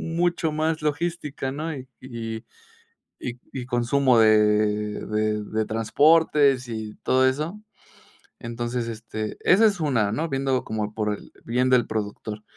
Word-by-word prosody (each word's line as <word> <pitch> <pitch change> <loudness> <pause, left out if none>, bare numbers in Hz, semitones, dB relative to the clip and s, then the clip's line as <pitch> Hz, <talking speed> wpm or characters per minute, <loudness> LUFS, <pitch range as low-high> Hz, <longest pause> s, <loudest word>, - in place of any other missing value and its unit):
mucho 170 -2 +1
más 155 +1 -1
logística, 150 -3 -2
¿no? 155 +4 -4
y 130 -1 -9
y 115 -3 -6 0.8
y 125 0 -6
y 130 -2 -5
consumo 125 +1 +2
de 105 -1 +3
de 105 0 0
de 110 +1 -1
transportes 140 +3 +3
y 110 -2 -5
todo 130 0 +3
eso. 155 +9 -1 0.8
Entonces, 120 0 -3
este, 110 -1 -5
esa 210 +5 +5
es 200 -5 +1
una, 115 -10 +1
¿no?, 160 +9 -1
viéndolo 135 -2 0
como 105 -1 -3
por 105 -1 -1
el - - -12
bien 125 +2 +1
del 125 -2 +4
productor, 105 0 -4
125 Hz, 140 wpm, -24 LUFS, 110-145 Hz, 0.8 s, esa